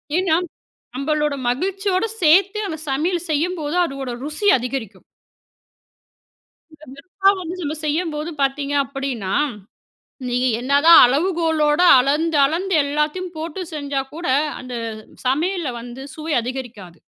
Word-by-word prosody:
ஏன்னா 360 -3 +2 0.6
நம்பளோட 300 +2 0
மகிழ்ச்சியோடு 380 - 0
சேர்த்தே 385 +6 +4
அந்த 320 -4 -5
சமையல 330 +6 0
செய்யும்போது 315 +1 -1
அதோட 275 -4 -5
ருசி 305 +8 -3
அதிகரிக்கும். 235 -6 -6 1.9
வெறுப்பா 385 +6 +1
வந்து 350 +1 -5
நம்ம 305 -1 -3
செய்யும்போது 310 0 -2
பார்த்தீங்க 275 +1 -1
அப்டின்னா, 270 -7 -4 0.9
நீ 245 0 0 0.2
என்னதான் 285 +6 +6
அளவுகோலோடு 320 +2 +2
அளந்து 300 +4 +1
அளந்து 360 +6 -1
எல்லாத்தையும் 300 +5 -2
போட்டு 325 +3 -5
செஞ்சா 285 -2 -2
கூட, 340 -2 -5 0.3
அந்த 250 0 -8 0.5
சமையல்ல 325 +3 0
வந்து 240 +2 -9
சுவை 315 0 -4
அதிகரிக்காது. 230 -9 -7
300 Hz, 105 wpm, -20 LUFS, 270-345 Hz, 1.9 s, என்னதான்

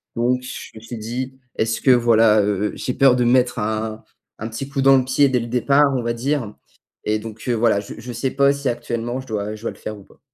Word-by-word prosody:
Donc 125 +2 +1
je 125 - -8
me - - -9
suis 115 +1 -8
dit: 125 +4 -5 0.2
«Est-ce 115 +1 -1
que 130 - +5
voilà, 115 -3 +5
heu, 105 0 0
j'ai 125 - -3
peur 135 -1 +5
de 125 - +1
mettre 125 +1 +3
un 110 +1 -3 0.4
un 110 +1 -4
petit 135 +5 -6
coup 140 -1 -2
dans 135 0 +7
le - - 0
pied 135 +2 +3
dès 125 -1 +1
le 115 - -5
départ, 140 +5 +3
on - - -1
va 115 0 -1
dire?» 120 -2 -2 0.5
Et 110 0 +1
donc 110 0 -9
heu, 125 - +2
voilà, 115 -3 +2
je 100 - -9
je 120 +2 -7
sais 125 +3 -2
pas 140 0 +4
si 140 -1 -4
actuellement 120 +1 -3
je 130 - -15
dois 105 -1 -3
je 110 - -13
dois - - -1
le - - -15
faire 110 - -6
ou 100 - -14
pas. - - -23
120 Hz, 255 wpm, -21 LUFS, 110-130 Hz, 0.5 s, dans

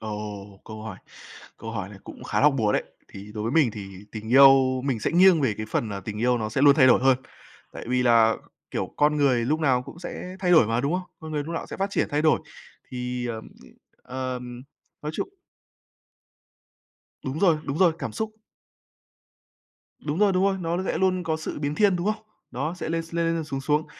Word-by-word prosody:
Ồ, 105 -2 -7
câu 110 -1 -9
hỏi 110 -4 -7 0.6
câu 115 - -7
hỏi 100 -4 -4
này 100 -1 -12
cũng - - -11
khá - - 0
hóc 150 -1 +5
búa 105 -2 +2
đấy. - - +1 0.3
Thì 100 +2 -11
đối 105 - -4
với 115 - -1
mình 150 -6 +4
thì 100 -2 -9
tình 110 0 -7
yêu 135 -1 +6
mình 130 -5 -1
sẽ - - 0
nghiêng 180 -1 +6
về 130 -7 +1
cái 110 - -4
phần, 110 - -1
à, 100 - -5
tình 105 +2 -6
yêu 125 +1 +2
nó 110 -1 -2
sẽ 130 +5 -1
luôn 145 -1 +8
thay 130 - +6
đổi 130 - +6
hơn. 130 -1 +4 0.5
Tại - - -8
vì 125 0 +2
là, 115 -2 +5 0.3
kiểu, - - -4
con 150 +1 +3
người 130 -5 +2
lúc 155 +6 0
nào 130 -5 +2
cũng 140 +5 -12
sẽ 180 +1 -7
thay 180 -2 +1
đổi 160 -10 +6
mà, 115 +2 0
đúng 140 +4 -1
không? 185 +1 -1 0.2
Con 160 0 -8
người 150 -1 -1
lúc 165 +3 -5
nào - - -4
sẽ - - -7
phát 195 +1 -1
triển, - - 0
thay 145 +1 0
đổi. 155 - +3 0.5
Thì, 125 -1 -3
ờm, 115 -2 -4 0.6
ừm, 125 - -12
ờm, 125 -1 -5 0.4
nói 150 +1 -4
chung - - -3 1.9
Đúng 130 +3 -4
rồi, 170 -3 +4
đúng 140 +2 -3
rồi, 180 -3 +5
cảm - - -4
xúc. 220 -1 -4 1.7
Đúng 150 +2 -3
rồi, 205 -1 +4
đúng 185 +1 +2
rồi, 195 -1 +1
nó 170 +1 -1
sẽ - - -1
luôn 185 0 +1
có 160 -1 0
sự 155 - -5
biến 145 0 -2
thiên, 200 +1 +3
đúng 175 +2 -3
không? 215 0 -1 0.3
Đó, 150 +7 -3
sẽ 180 - -5
lên 165 0 -1
s 165 0 -13
lên 165 0 +1
lên 165 -1 -2
xuống 135 -2 -4
xuống. 150 +3 0
135 Hz, 225 wpm, -25 LUFS, 115-165 Hz, 1.9 s, luôn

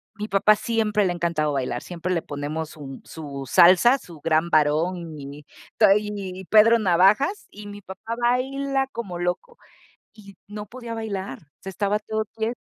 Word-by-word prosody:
mi 210 +1 -5
papá 210 +1 +4
siempre 215 -2 0
le 180 - +1
ha - - -3
encantado 155 -3 -1
bailar, 125 -3 -2
siempre 180 +1 -4
le 165 - 0
ponemos 150 +2 -5
sun 135 -3 -10
su 140 -4 -8
salsa, 185 +9 +6
su 170 - -14
Gran 160 +1 +1
Varón 160 +2 +1
y 140 +2 -9 0.3
tai 210 0 +4
y 190 -2 -7
Pedro 220 +3 +6
Navajas, 205 - +2
y 210 +1 -12
mi 205 0 -9
papá 190 +4 -7
baila 270 +3 0
como 195 -7 -6
loco. 180 - -3 0.6
Y 200 -3 -15
no 210 0 -7
podía 235 +2 -8
bailar, 200 -3 -5 0.2
se 195 - -7
estaba 200 +2 -1
todo 220 0 -3
quie 225 +2 -2
195 Hz, 165 wpm, -23 LUFS, 165-220 Hz, 0.6 s, salsa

